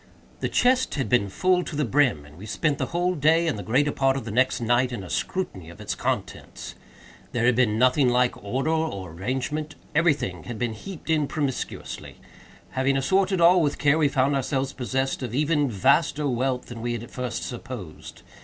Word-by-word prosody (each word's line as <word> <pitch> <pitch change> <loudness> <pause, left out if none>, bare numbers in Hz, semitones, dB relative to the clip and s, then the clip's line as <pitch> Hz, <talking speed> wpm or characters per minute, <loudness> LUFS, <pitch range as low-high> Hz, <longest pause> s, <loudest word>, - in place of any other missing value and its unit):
The - - -1
chest 255 +1 +2
had 130 -7 -2
been 120 -5 +2
full 180 - +2
to 165 - -6
the 150 0 +1
brim, 125 - +2
and 75 +1 -15
we 100 +6 -10
spent 145 +5 0
the - - -1
whole 175 +1 0
day, 165 +2 +3
and 160 - 0
the 105 - -5
greater 130 +9 +2
part 135 -1 +1
of 135 - -5
the 115 - -5
next 130 +4 +2
night, 120 +2 +2
in 115 -6 -5
a 90 - -9
scrutiny 95 - -3
of 85 - -13
its - - -3
contents. - - -4 0.6
There 120 -1 +1
had 125 -1 +4
been 110 -4 +2
nothing 130 +2 +4
like 125 0 +2
order 130 +9 -1
or 155 - -2
arrangement. 130 - -3 0.2
Every 165 0 +4
thing 90 - -6
had 120 -2 -6
been 120 0 -1
heaped 165 - -7
in 155 -3 +2
promiscuously. 140 -5 -4 0.6
Having 135 +5 +1
assorted 190 +6 +2
all 175 +1 +6
with 145 -2 0
care, 145 +2 +3
we 150 - +4
found 140 +1 +1
ourselves 135 0 -1
possessed 130 +2 -2
of 120 -2 -4
even 150 -1 +2
vaster 140 - +2
wealth 130 0 -1
than 120 -2 -8
we 120 +1 -2
had 120 -1 -4
at - - -12
first 125 -2 -4
supposed. 120 - -8
130 Hz, 200 wpm, -25 LUFS, 120-150 Hz, 0.6 s, all